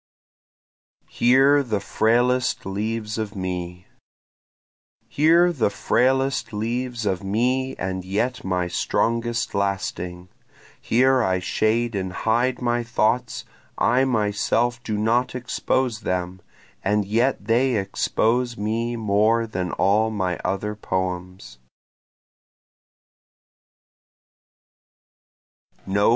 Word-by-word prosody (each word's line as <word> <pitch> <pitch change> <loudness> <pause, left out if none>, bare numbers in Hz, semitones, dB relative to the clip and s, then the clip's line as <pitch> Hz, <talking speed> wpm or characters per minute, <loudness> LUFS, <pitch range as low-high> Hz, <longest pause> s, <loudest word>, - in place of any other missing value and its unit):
Here 135 +4 +4
the 110 -6 -2
Frailest 125 +5 +1
Leaves 105 +3 -3
of 105 -1 -4
Me 90 -1 -5 1.2
Here 170 +4 +4
the 125 -9 +1
frailest 130 +1 +1
leaves 120 +2 -3
of 95 -2 -1
me 125 +6 0
and 95 -1 -4
yet 105 +7 -2
my 90 -1 -1
strongest 115 +6 -1
lasting, 90 -2 -3 0.5
Here 130 +2 +3
I 95 -5 +1
shade 110 +5 0
and 95 -2 -3
hide 120 +5 0
my 120 0 +1
thoughts, 115 +1 0 0.3
I 125 +3 +3
myself 120 +1 0
do 110 -3 -3
not 120 +4 +1
expose 125 -1 -1
them, 90 -2 -3 0.4
And 105 +1 +1
yet 115 +2 0
they 120 +3 +2
expose 115 +4 0
me 115 +3 -2
more 110 +1 +2
than 90 -5 -3
all 105 +3 +2
my 95 -5 -2
other 105 +2 -2
poems. 90 - -4
110 Hz, 95 wpm, -23 LUFS, 95-120 Hz, 1.2 s, Here